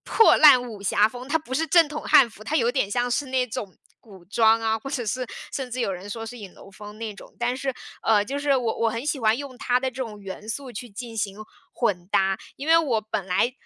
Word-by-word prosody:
破 450 - +5
烂 280 -5 +8
武 210 -4 -9
侠 205 +2 +3
风。 250 +3 -8
它 305 - +2
不 295 -5 -12
是 320 +5 +1
正 330 +1 +5
统 300 +1 -6
汉 265 - +6
服， 210 - -14
它 295 +8 -1
有 240 -3 +2
一 - - -11
点 260 -7 0
像 245 +3 0
是 280 +4 0
那 255 -1 0
种 205 -4 -6 0.2
古 195 -6 -16
装 225 +3 +4
啊， 225 0 0
或 245 - -8
者 270 -4 -3
是 250 +4 -2 0.3
甚 265 -3 -4
至 255 - -4
有 200 - 0
人 185 +2 -8
说 225 +2 -5
是 245 +2 -8
影 200 -4 -10
楼 195 - -15
风 210 +1 -11
那 220 -1 -5
种。 - - -15
但 240 +1 0
是， 265 0 -3 0.3
呃， 210 -2 +3
就 275 +5 -4
是 285 -1 +2
我 235 -3 -1
我 230 - +2
很 230 +3 -4
喜 285 -4 -1
欢 220 +1 +3
用 270 -2 -8
它 245 -2 +1
的 260 0 -2
这 250 - -18
种 215 -4 -8
元 200 +2 -9
素 255 +2 -5
去 240 +4 -7
进 230 +2 -8
行 200 -2 -3 0.4
混 180 -7 -1
搭。 195 0 +2 0.2
因 280 - -7
为 325 +1 +6
我 260 -9 +1
本 215 -3 -4
来 195 +7 +1
235 Hz, 280 characters per minute, -24 LUFS, 210-260 Hz, 0.4 s, 烂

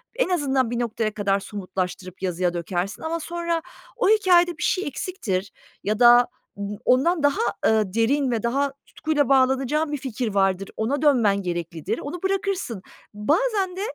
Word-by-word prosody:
en - - +1
azından 270 -8 +1
bir 240 - -1
noktaya 225 -2 -1
kadar 200 -2 +1
somutlaştırıp 185 -2 -5
yazıya 180 -1 0
dökersin 175 +3 -3
ama 330 +1 -2
sonra 340 0 -2 0.4
o - - +2
hikâyede 355 -5 +4
bir - - -4
şey 375 -5 0
eksiktir 205 - -3 0.3
ya 210 +2 -1
da 240 0 +7 0.3
b 200 +1 -5
ondan 290 +5 +3
daha, 285 +9 +2 0.2
eee, 215 -4 +2
derin 255 +4 +2
ve 230 -3 -1
daha 275 +3 0
tutkuyla 295 -4 -1
bağlanacağın 270 +3 +2
bir 295 - -1
fikir 245 -5 -4
vardır, 195 -1 +1
ona 260 +6 -1
dönmen 230 -10 +3
gereklidir, 175 +2 -3
onu 335 +6 -6
bırakırsın. 385 - -1 0.3
Bazen 365 - 0
de, 380 - -5
245 Hz, 155 wpm, -24 LUFS, 200-320 Hz, 0.4 s, da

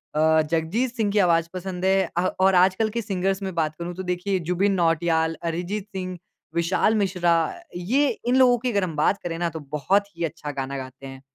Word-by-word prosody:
अ, 160 +1 +4
जगजीत 205 +11 0
सिंह 215 -4 0
की 210 - +2
आवाज़ 170 -3 +3
पसंद 185 0 -4
है 190 -2 +3
अ 175 - +3 0.2
और 190 -1 +4
आजकल 190 +4 +3
के 235 +2 -2
सिंगर्स 195 -1 -1
में 190 -2 -3
बात 155 -2 0
करूँ 170 +1 -4
तो 190 - -5
देखिए 185 +2 -1
जुबिन 195 +3 +2
नौटियाल, 165 -2 +1
अरिजीत 180 +5 -3
सिंह, 185 -1 -4 0.4
विशाल 175 +6 +2
मिश्रा। 180 -3 +1 0.4
ये 245 +12 +1 0.2
इन 245 - +3
लोगों 255 -2 +5
की 245 +1 -2
अगर 200 -3 +1
हम 165 -4 -3
बात 155 +7 +2
करें 165 -1 -3
ना 175 -1 0
तो 160 0 -7 0.2
बहुत 200 +7 +2
ही 170 - -3
अच्छा 155 -2 -6
गाना 140 +1 -4
गाते 130 +1 -8
हैं। 135 0 -10
180 Hz, 205 wpm, -24 LUFS, 165-200 Hz, 0.4 s, लोगों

